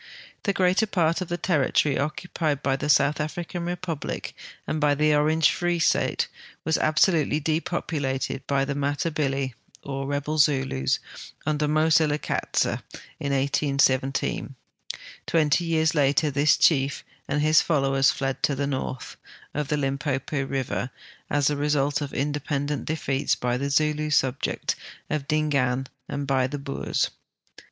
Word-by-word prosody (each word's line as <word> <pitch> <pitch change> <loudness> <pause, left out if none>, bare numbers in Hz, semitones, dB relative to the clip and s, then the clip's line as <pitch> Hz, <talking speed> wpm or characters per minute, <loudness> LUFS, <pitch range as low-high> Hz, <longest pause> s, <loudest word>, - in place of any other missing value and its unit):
The 200 - +3
greater 185 +3 +2
]>art 170 -1 +2
of 185 - -3
the 175 - -2
territory 150 -4 +1
occupied 150 -1 -2
by 135 -1 +2
the 145 +2 -3
South 145 +1 +4
African 170 +3 -4
Republic 175 -3 -4 0.3
and 155 - -2
by 145 -1 +3
the 150 +1 +3
Orange 155 +1 +4
Eree 175 0 +1
State - - +2 0.4
was 160 0 +2
absolutely 155 -1 +3
depoi:>u 160 0 -2
lated 135 0 -2
by 140 -1 +1
the 140 - -2
Matabili 140 -2 -1 0.3
(or 135 0 -4
rebel 145 +2 -2
Zulus) 135 - +2 0.5
under 150 0 +1
Moselekatse 155 0 +2 0.5
in 140 - -2
1817. 135 -1 +1 0.7
Twenty 160 +1 +2
years 160 -1 +2
later 145 0 +2
this 145 +2 +3
chief 140 -3 +3 0.2
and 145 +1 0
his 155 +1 +5
followers 135 -3 +2
fled 135 -1 -2
to 140 - +2
the 140 +1 -1
north 130 -2 -4 0.4
of 150 -1 -2
the 150 - 0
Limpopo 135 0 -1
river, 135 -2 -2 0.4
as 145 -1 +1
the 150 - +3
result 145 0 +1
of 145 - -4
independent 145 0 -2
defeats 140 -3 0
by 125 0 -1
the 140 +3 -2
Zulu 150 +1 +1
subjects 130 -3 0 0.4
of 145 -2 -2
Dingaan 140 -4 +1 0.2
and 140 0 -3
l)y 130 -2 +2
the 145 +2 -4
Boers. 140 0 -2
145 Hz, 140 wpm, -25 LUFS, 135-155 Hz, 0.7 s, his